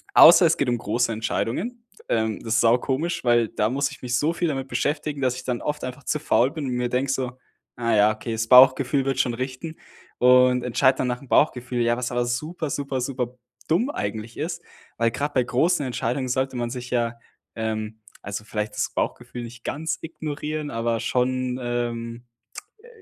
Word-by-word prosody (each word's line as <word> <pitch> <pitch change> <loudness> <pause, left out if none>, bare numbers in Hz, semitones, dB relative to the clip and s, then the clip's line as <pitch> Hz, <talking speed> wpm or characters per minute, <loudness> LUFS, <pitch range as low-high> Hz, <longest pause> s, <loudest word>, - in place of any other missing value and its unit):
außer 170 +2 +9
es 165 +1 +2
geht 140 - +1
um 120 - +1
große 115 +3 0
Entscheidungen, 165 - -2 0.3
ähm, 110 -2 0
das 115 0 -1
ist 115 - +4
saukomisch, 130 +8 +1
weil 120 -2 +3
da 105 - 0
muss 140 +3 0
ich 140 - -12
mich 125 0 0
so 155 +5 +1
viel 170 0 -1
damit 135 -3 -3
beschäftigen, 145 0 -2
dass 130 -1 +1
ich 130 - -7
dann 125 -2 -2
oft 150 0 -3
einfach 130 +2 -6
zu 150 - 0
faul 130 -4 +3
bin 155 -2 -5
und - - -2
mir 125 0 -1
denke 130 +2 0
so: 130 -2 -2 0.4
„Ah, 115 -1 0
ja, 105 +1 +5
okay, 115 +2 -6
das 115 0 -2
Bauchgefühl 130 +2 +6
wird 135 -1 -1
schon 125 -2 +1
richten“. 130 +6 -5 0.4
Und 125 0 +5
entscheide 130 +2 +2
dann 130 - 0
nach 125 0 -2
dem 140 - -15
Bauchgefühl, 125 -3 +2
ja, 120 0 +2
was 125 0 -3
aber 120 0 0
super, 155 +6 -3
super, 140 -2 -2
super 125 -1 -3 0.3
dumm 190 - +2
eigentlich 110 - -4
ist. 170 +2 -4 0.3
Weil 115 0 +2
grad 145 +4 -3
bei 125 - +3
großen 140 +5 +1
Entscheidungen 125 +1 -2
sollte 130 +1 -1
man 120 -1 -2
sich 125 0 -6
ja, 120 -1 0 0.4
ähm, 110 -1 -3 0.2
also, 100 +2 -5
vielleicht 105 -1 -3
das - - -1
Bauchgefühl 120 - -3
nicht 120 0 -10
ganz 160 +2 -2
ignorieren, 155 -1 -5
aber 115 0 -1
schon, 130 0 0
ähm, 120 -1 -3 0.6
äh, - - -15
125 Hz, 195 wpm, -24 LUFS, 120-140 Hz, 0.6 s, außer